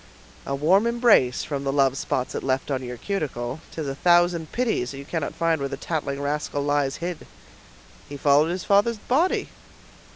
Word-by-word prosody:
"A 140 - -1
warm 185 +10 +3
embrace, 235 - +3
from 140 -2 -4
the 135 - 0
love 135 -1 +2
spots 130 -2 -2
it - - -3
left 135 +2 -1
on 130 -1 -1
your 125 -1 -6
cuticle; 140 - -3
'tis 155 -3 -5
a 135 - -2
thousand 175 +1 +2
pities 225 - 0
that 135 - -8
you 140 - -8
cannot 160 -1 -3
find 165 -2 +1
where 140 - -2
the 135 - -5
tattling 140 -3 -3
rascal 145 0 -2
lies 145 -1 +1
hid." 175 0 -5 0.8
"He 145 - -6
followed 145 +3 +4
his 180 +1 -3
father's 205 +3 +3
body." 290 - 0
145 Hz, 185 wpm, -24 LUFS, 135-175 Hz, 0.8 s, followed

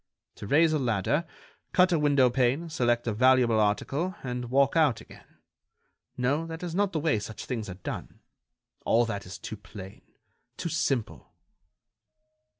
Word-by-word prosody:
To - - -8
raise 155 +6 +4
a 155 - +1
ladder, 125 - 0 0.5
cut 180 0 +4
a 170 - +2
window 140 -4 +4
pane, 135 +6 0
select 120 -5 +1
a 115 - -1
valuable 125 -1 +4
article, 135 - 0
and 125 -1 -4
walk 140 +3 +3
out 150 -8 +3
again—no, 140 +6 -7
that 165 +1 -7
is 175 -2 -4
not 200 +1 +1
the 160 - -1
way 150 -8 +1
such 105 +1 -7
things 115 -5 -4
are 90 - -6
done. 90 - -7 0.6
All 120 +1 +3
that 100 -5 -5
is 90 - -8
too 110 - -7
plain, 95 -1 -11 0.6
too 170 - -3
simple." 125 - -2
130 Hz, 150 wpm, -28 LUFS, 110-160 Hz, 0.6 s, raise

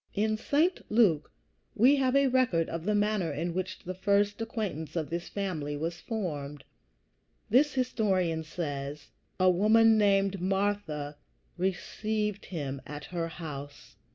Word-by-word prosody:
In 215 +1 +1
St. 305 +10 +1
Luke 200 -10 +3 0.4
we 260 +6 +5
have 260 -1 +2
a 275 0 +5
record 245 -11 +2
of 165 0 -5
the 210 +1 +2
manner 205 -4 +1
in 165 +4 -2
which 185 +1 -3
the 185 - -6
first 200 +2 +1
acquaintance 205 - -4
with 160 -2 -2
this 170 +1 -3
family 160 -8 -3
was 165 +3 -4
formed. 150 - -4 0.9
This 275 +5 +4
historian 190 -10 +1
says: 145 -3 -5 0.3
"A 185 0 +5
woman 220 +4 +5
named 195 -2 +2
Martha 190 -7 -1 0.4
received 210 +3 -2
him 140 -6 -4
at 150 0 -7
her 170 -1 -1
house." 145 -6 -8
185 Hz, 135 wpm, -29 LUFS, 160-215 Hz, 0.9 s, we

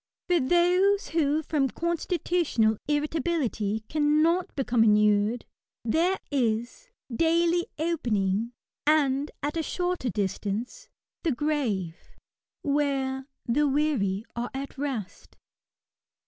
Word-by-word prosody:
For 355 -2 +3
those 355 +7 +3
who 310 -1 +1
from 280 -3 0
constitutional 340 - 0
irritability 290 -8 -1
cannot 310 +4 +2
become 245 -4 +2
inured, 210 +1 +3 0.4
there 340 +11 +2
is, 240 - -1 0.3
daily 335 +3 +2
opening, 230 - 0 0.4
and 290 -2 +3
at 300 +3 -1
shorter 355 -6 -2
distance, 210 - -3 0.3
the 330 - +1
grave, 240 - -2 0.5
where 275 -2 0
" - - -59
the 290 +5 +2
weary 260 -9 0
are 240 +1 -3
at 275 +1 -5
rest." 265 -9 -5
285 Hz, 95 wpm, -27 LUFS, 230-330 Hz, 0.5 s, For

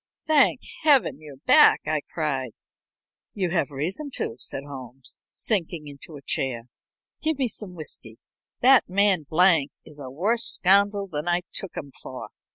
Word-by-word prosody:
"Thank 290 -4 +3 0.2
Heaven 285 - +3
you're 145 -3 -12
back," 135 - +5
I 155 -1 -1
cried. 135 -7 -3 0.8
"You 185 -4 -1
have 170 -3 0
reason 170 - -4
to," - - -3
said 135 - -4
Holmes, 130 -2 -10
sinking 170 -7 -1
into 145 +2 -9
a 140 - -12
chair. 125 -3 -2 0.6
"Give 315 -2 0
me 265 -3 0
some 210 -5 -7
whiskey. 125 -8 -6 0.4
That 260 -3 +5
man 190 -5 +2
Blank 165 -4 +4 0.2
is 150 -2 -14
a 135 -2 -7
worse 210 - +2
scoundrel 200 +1 +3
than 150 -2 -5
I 175 0 +2
took 195 - -3
him 140 -2 -6
for." 130 - -8
165 Hz, 155 wpm, -24 LUFS, 140-200 Hz, 0.8 s, back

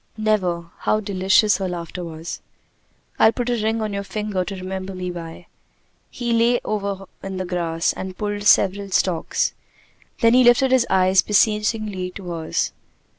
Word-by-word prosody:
"Never!" 180 -6 0
How 215 - +1
delicious 200 +1 +3
her 190 -1 -2
laughter 175 0 -5
was. 165 0 -7 0.8
"I'll 220 - +6
put 245 +1 -2
a 235 -3 -1
ring 220 0 0
on 210 -1 -3
your 200 - -2
finger 205 -2 -3
to 195 +2 -6
remember 190 +1 -5
me 180 -1 -4
by." 170 0 -8 0.6
He 240 -1 -2
lay 235 +1 +3
over 200 -2 -3 0.2
in 195 -1 -5
the 185 - -3
grass 170 -2 -1
and 190 -1 -7
pulled 205 -1 -3
several 200 0 +4
stalks. 185 -2 0 0.7
Then 230 0 +5
he 255 +1 +6
lifted 245 +2 +5
his 255 -2 +3
eyes 185 0 +4
beseechingly 210 -2 +1
to 180 -3 -7
hers. 165 -1 -2
195 Hz, 160 wpm, -22 LUFS, 185-215 Hz, 0.8 s, I'll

